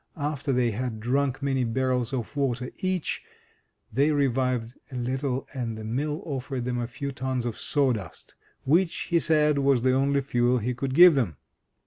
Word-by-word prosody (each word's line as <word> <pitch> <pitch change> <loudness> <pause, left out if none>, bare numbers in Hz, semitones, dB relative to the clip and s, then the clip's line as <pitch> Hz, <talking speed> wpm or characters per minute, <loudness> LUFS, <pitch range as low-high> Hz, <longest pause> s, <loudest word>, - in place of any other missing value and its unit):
After 145 -1 -2
they 125 -2 +2
had 115 0 -3
drunk 135 +4 0
many 135 -2 +1
barrels 125 +1 0
of 130 0 -4
water 130 -3 -1
each, 185 -3 -1 0.7
they 140 +6 +3
revived 130 -4 0 0.2
a - - -7
little, 130 +2 -2
and 120 -4 -3
the 110 - -7
mill 145 - -2
offered 135 -3 -4
them 125 -1 -1
a 120 - -2
few 135 +3 -5
tons 130 -2 -2
of 120 -2 -2
sawdust, 125 - -1 0.3
which, 165 +5 +3 0.2
he 170 - +4
said, 150 -3 +3
was 135 -3 +3
the 130 0 +3
only 140 +1 +2
fuel 125 -1 +2
he 125 +2 -1
could 130 +2 -3
give 175 +1 +9
them. 110 - 0
130 Hz, 170 wpm, -26 LUFS, 120-140 Hz, 0.7 s, give